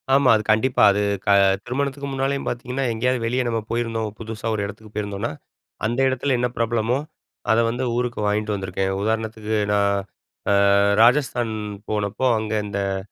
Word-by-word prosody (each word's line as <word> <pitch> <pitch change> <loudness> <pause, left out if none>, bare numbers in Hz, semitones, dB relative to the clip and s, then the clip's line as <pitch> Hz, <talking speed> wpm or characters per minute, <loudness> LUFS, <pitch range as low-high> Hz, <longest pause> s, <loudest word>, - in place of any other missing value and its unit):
ஆமா. 135 -1 +5
அது 110 - 0
கண்டிப்பா. 110 +4 +2
அது 100 +1 0 0.2
க - - -1 0.4
திருமணத்துக்கு 140 +2 -2
முன்னாலேயும் 135 +1 -1
பாத்தீங்கன்னா, 125 +2 -3
எங்கயாது 125 +3 0
வெளிய 125 +3 0
நம்ம 115 -1 0
போயிருந்தோம். 115 -2 -1
புதுசா 110 -1 -6
ஒரு 105 -2 -1
இடத்துக்கு 105 +1 -10
போயிருந்தோம்ன்னா, 100 +1 -3 0.5
அந்த 120 +4 -1
இடத்துல 130 +1 0
என்ன 125 - +2
பிரபலமோ 115 +1 +1 0.5
அத 110 - +4
வந்து 120 +3 -2
ஊருக்கு 125 -1 -2
வாங்கிட்டு 105 +1 0
வந்துருக்கேன். 95 0 -2
உதாரணத்துக்கு 110 0 -2 0.2
நான் 100 -1 +2 0.8
அ - - +5 0.3
ராஜஸ்தான் 120 -2 +3 0.4
போனப்போ, 105 +3 -1
அங்க 110 0 -4
இந்த 100 -1 -3 0.2
அ - - -1
115 Hz, 150 wpm, -22 LUFS, 105-125 Hz, 0.8 s, ஆமா